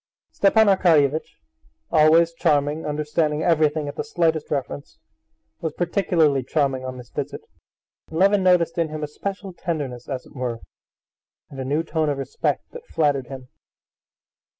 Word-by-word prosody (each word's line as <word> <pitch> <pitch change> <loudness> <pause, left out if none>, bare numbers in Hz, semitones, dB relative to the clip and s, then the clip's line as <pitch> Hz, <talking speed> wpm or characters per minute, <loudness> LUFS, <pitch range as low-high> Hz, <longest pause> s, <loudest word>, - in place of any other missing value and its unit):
Stepan 220 +2 +4
Arkadyevitch, 160 -7 +3 0.5
always 165 +2 +5
charming, 150 -1 +1
understanding 150 +1 -1
everything 155 -3 +2
at 145 - -6
the - - -2
slightest 165 -8 0
reference, 140 0 -4 0.6
was 160 -2 -3
particularly 170 -6 +1
charming 135 0 0
on 130 0 -6
this 125 -1 -12
visit, - - -5 0.7
and 160 - -6
Levin 200 +2 +4
noticed 180 -2 +3
in 165 -2 +1
him 155 0 -5
a - - -1
special 195 +5 -6
tenderness, 145 -8 -4
as 130 -2 -4
it - - -17
were, 125 -3 -3 0.9
and 135 - -9
a - - -2
new 145 +5 0
tone 160 -2 -1
of 145 - -1
respect 135 -2 -2
that 485 0 -11
flattered 145 -5 0
him. 130 -1 -9
155 Hz, 150 wpm, -23 LUFS, 140-170 Hz, 0.9 s, always